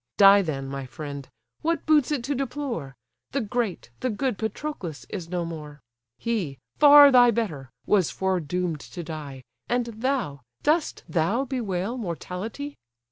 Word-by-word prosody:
Die 200 0 +8
then, 140 -7 -3
my 135 0 -4
friend! 140 0 -7 0.3
what 330 -1 0
boots 305 -4 +4
it 280 -5 0
to 280 +4 -1
deplore? 255 - -3 0.4
The 275 - +1
great, 215 - -2
the 255 - -1
good 245 0 -1
Patroclus 220 - -4
is 175 -5 -5
no 175 -1 -1
more! 150 -3 -7 0.4
He, 190 - -2 0.2
far 290 -1 +10
thy 245 -1 +7
better, 175 - -2 0.2
was 195 -5 +3
foredoom'd 180 -3 -1
to 175 +4 -8
die, 150 -5 -7 0.3
And 245 0 +1
thou, 235 - -2 0.2
dost 310 +1 +1
thou 195 +10 +1
bewail 230 -3 -2
mortality? 210 - -5
200 Hz, 140 wpm, -26 LUFS, 160-255 Hz, 0.4 s, far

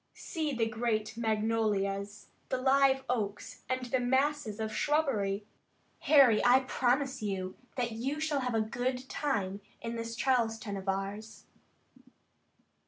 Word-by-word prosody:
See 315 -4 -3
the 235 -4 +1
great 220 -1 -1
magnolias, 210 -3 -1 0.2
the 260 - 0
live 265 +1 +3
oaks, 210 -5 -3
and 255 0 -1
the 255 +1 0
masses 260 -3 0
of 220 0 -3
shrubbery! 215 -9 0 0.5
Harry, 270 -8 +6
I 255 +2 +6
promise 260 +1 0
you 190 -3 -3 0.2
that 240 -2 0
you 265 +7 -3
shall 310 -2 0
have 250 -3 -1
a 220 - +3
good 250 +3 -2
time 205 -9 -1 0.2
in 230 0 -4
this 230 0 -4
Charleston 225 -5 0
of 195 0 -4
ours." 200 +3 -4
230 Hz, 130 wpm, -31 LUFS, 210-265 Hz, 0.5 s, Harry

